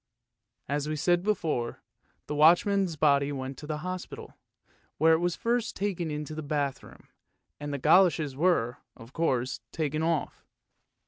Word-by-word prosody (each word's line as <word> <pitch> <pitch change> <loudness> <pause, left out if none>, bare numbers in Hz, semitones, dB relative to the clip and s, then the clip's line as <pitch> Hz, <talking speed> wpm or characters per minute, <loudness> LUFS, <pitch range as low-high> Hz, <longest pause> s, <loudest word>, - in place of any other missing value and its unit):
As 145 +2 -2
we 155 - -1
said 175 +4 +2
before, 165 - -2 0.4
the - - -4
watchman's 175 +4 +4
body 140 -2 +3
went 135 -1 -5
to 150 - -9
the 155 -1 -2
hospital, 185 0 -6 0.6
where 160 +2 +5
it 160 - +3
was 175 0 0
first 235 -1 -1
taken 185 -5 -2
into 150 0 -5
the 155 - -5
bathroom 145 -2 -4 0.5
and 145 0 -5
the 140 - -2
goloshes 155 -1 +4
were, 140 -7 +1 0.2
of 115 +4 -14
course, 130 -7 -1
taken 155 -1 -2
off. 165 -1 -1
155 Hz, 145 wpm, -28 LUFS, 140-175 Hz, 0.6 s, where